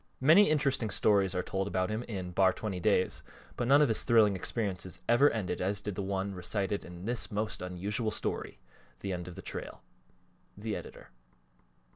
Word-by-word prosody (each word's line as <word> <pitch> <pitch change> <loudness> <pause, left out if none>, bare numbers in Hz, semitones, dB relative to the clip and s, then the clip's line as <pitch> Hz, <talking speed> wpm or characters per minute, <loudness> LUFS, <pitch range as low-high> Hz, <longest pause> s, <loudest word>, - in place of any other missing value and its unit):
Many 160 +9 +6
interesting 140 -7 +1
stories 100 -1 +2
are 90 - 0
told 95 0 -2
about 95 +1 -1
him 110 +2 -2
in 95 -5 -5
"Bar 95 +1 +3
20 100 -4 -4
Days" 95 0 +1 0.3
but 120 - -2
none 140 +3 +6
of - - +4
his 110 - +2
thrilling 110 -4 +4
experiences 95 -3 -3
ever 120 +5 +5
ended 110 -5 -3
as 100 +2 0
did 100 0 -4
the 100 - -4
one 95 0 -2
recited 100 +2 -2
in 90 +1 -10
this 120 +1 -1
most 105 0 -2
unusual 100 +5 -2
story, 110 - -3 0.4
"The 100 -1 -3
End 90 -1 -5
of 90 - -8
the - - -9
Trail."_ - - -6 0.8
THE 105 +1 -3
EDITOR. - - -10
100 Hz, 180 wpm, -31 LUFS, 95-110 Hz, 0.8 s, Many